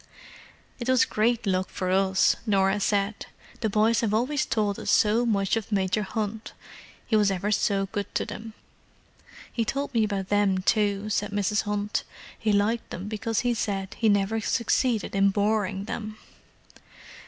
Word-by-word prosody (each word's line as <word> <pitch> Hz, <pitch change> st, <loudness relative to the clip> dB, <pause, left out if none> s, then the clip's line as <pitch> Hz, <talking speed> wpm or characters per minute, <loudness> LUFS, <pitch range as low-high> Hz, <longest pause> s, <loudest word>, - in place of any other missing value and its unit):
"It 240 Hz, +1 st, -3 dB
was 255 Hz, -2 st, +5 dB
great 230 Hz, +2 st, 0 dB
luck 185 Hz, -1 st, 0 dB
for 185 Hz, -1 st, -3 dB
us," 190 Hz, 0 st, +3 dB
Norah 195 Hz, 0 st, +2 dB
said. 200 Hz, +1 st, -1 dB, 0.3 s
"The 220 Hz, -, 0 dB
boys 220 Hz, +2 st, +2 dB
have 215 Hz, -2 st, 0 dB
always 265 Hz, +5 st, 0 dB
told 210 Hz, -3 st, 0 dB
us -, -, -4 dB
so 220 Hz, +3 st, +3 dB
much 200 Hz, -3 st, +1 dB
of 225 Hz, -1 st, -4 dB
Major 195 Hz, 0 st, +1 dB
Hunt. 215 Hz, +2 st, -4 dB, 0.5 s
He 220 Hz, -, 0 dB
was 210 Hz, -2 st, +4 dB
ever 195 Hz, +2 st, -1 dB
so 200 Hz, -1 st, +1 dB
good 200 Hz, +1 st, -5 dB
to -, -, 0 dB
them." 225 Hz, 0 st, -8 dB, 1.0 s
"He 230 Hz, -, 0 dB
told 275 Hz, +4 st, -3 dB
me 230 Hz, -2 st, +3 dB
about 200 Hz, -3 st, -2 dB
them, 200 Hz, -2 st, +2 dB
too," 205 Hz, 0 st, +1 dB
said 205 Hz, 0 st, 0 dB
Mrs. 205 Hz, +1 st, 0 dB
Hunt. 205 Hz, 0 st, -1 dB, 0.4 s
"He 220 Hz, -, +1 dB
liked 210 Hz, +3 st, +1 dB
them 190 Hz, +3 st, -6 dB
because 220 Hz, +1 st, -1 dB
he 245 Hz, -1 st, +1 dB
said 195 Hz, -4 st, -3 dB
he 225 Hz, -, +2 dB
never 205 Hz, +2 st, +1 dB
succeeded 235 Hz, 0 st, 0 dB
in 195 Hz, 0 st, +4 dB
boring 205 Hz, -1 st, 0 dB
them!" 215 Hz, 0 st, -5 dB
210 Hz, 165 wpm, -26 LUFS, 195-225 Hz, 1.0 s, was